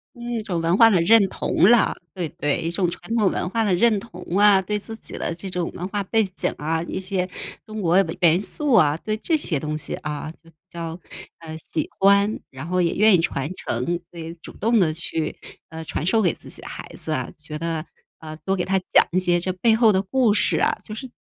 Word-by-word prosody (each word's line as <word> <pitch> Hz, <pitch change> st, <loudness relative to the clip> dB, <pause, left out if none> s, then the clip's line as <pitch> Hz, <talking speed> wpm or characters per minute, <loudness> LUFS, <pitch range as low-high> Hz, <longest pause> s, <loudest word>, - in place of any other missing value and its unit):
嗯， 240 Hz, -, -16 dB
一 230 Hz, -, -1 dB
种 185 Hz, -6 st, -3 dB
文 165 Hz, +2 st, +2 dB
化 230 Hz, 0 st, +8 dB
的 190 Hz, -6 st, +3 dB
认 210 Hz, +4 st, +6 dB
同 190 Hz, -, +2 dB
了， 240 Hz, -1 st, +4 dB, 0.2 s
对， 180 Hz, -3 st, -3 dB
对。 145 Hz, -1 st, +1 dB
一 165 Hz, -, -1 dB
种 175 Hz, +1 st, 0 dB
传 220 Hz, -, -7 dB
统 210 Hz, -5 st, +3 dB
文 180 Hz, -, -2 dB
化 225 Hz, +2 st, 0 dB
的 200 Hz, -4 st, +1 dB
认 215 Hz, +3 st, +3 dB
同 180 Hz, -5 st, -11 dB, 0.2 s
啊， 205 Hz, -2 st, +6 dB
对 210 Hz, +3 st, -2 dB
自 215 Hz, +2 st, -6 dB
己 -, -, -8 dB
的 -, -, -2 dB
这 185 Hz, +3 st, -7 dB
种 180 Hz, -2 st, -3 dB
文 180 Hz, +1 st, -5 dB
化 205 Hz, 0 st, -2 dB
背 225 Hz, +3 st, +1 dB
景 -, -, -1 dB
啊， 160 Hz, +2 st, -1 dB
一 180 Hz, -, -4 dB
些 185 Hz, -1 st, -2 dB, 0.4 s
中 215 Hz, -1 st, -6 dB
国 170 Hz, 0 st, +2 dB, 0.2 s
元 170 Hz, +1 st, +4 dB
素 295 Hz, +1 st, 0 dB
啊， 150 Hz, -7 st, +5 dB
对 215 Hz, +5 st, -3 dB
这 315 Hz, +9 st, 0 dB
些 170 Hz, -, -1 dB
东 155 Hz, +2 st, -3 dB
西 155 Hz, -, -6 dB
啊 150 Hz, 0 st, -5 dB
就 165 Hz, -, -18 dB
比 160 Hz, -, -25 dB
较， 170 Hz, 0 st, -6 dB, 0.4 s
呃， 160 Hz, -1 st, -8 dB
喜 160 Hz, 0 st, -2 dB
欢， 200 Hz, +2 st, +4 dB
然 135 Hz, +5 st, -8 dB
后 180 Hz, 0 st, +1 dB
也 170 Hz, -, +1 dB
愿 215 Hz, +1 st, +5 dB
意 175 Hz, -, +3 dB
传 145 Hz, -2 st, -2 dB
承， 120 Hz, +2 st, -3 dB, 0.3 s
所 170 Hz, -, -10 dB
以 165 Hz, +1 st, -6 dB
主 -, -, -10 dB
动 225 Hz, 0 st, +2 dB
地 155 Hz, -3 st, +2 dB
去， 165 Hz, -1 st, -3 dB, 0.4 s
呃， 160 Hz, 0 st, -7 dB
传 160 Hz, -, -3 dB
授 220 Hz, +4 st, +3 dB
给 175 Hz, -5 st, +2 dB
自 -, -, -13 dB
己 -, -, -4 dB
的 -, -, -10 dB
孩 -, -, -7 dB
子 -, -, -3 dB
啊， -, -, -3 dB
觉 150 Hz, -, -7 dB
得， 165 Hz, 0 st, -3 dB, 0.3 s
呃， 155 Hz, -1 st, -8 dB
多 190 Hz, -, 0 dB
给 180 Hz, -, -1 dB
他 190 Hz, 0 st, +1 dB
讲 -, -, +5 dB
一 185 Hz, -, +3 dB
些 175 Hz, -1 st, +2 dB
这 185 Hz, +2 st, -2 dB
背 220 Hz, +5 st, +3 dB
后 220 Hz, -2 st, +5 dB
的 190 Hz, -, +2 dB
故 225 Hz, +2 st, +2 dB
事 210 Hz, -, +2 dB
啊， -, -, +2 dB
就 215 Hz, -, -8 dB
是 260 Hz, +3 st, -7 dB
185 Hz, 260 characters per minute, -23 LUFS, 165-210 Hz, 0.4 s, 化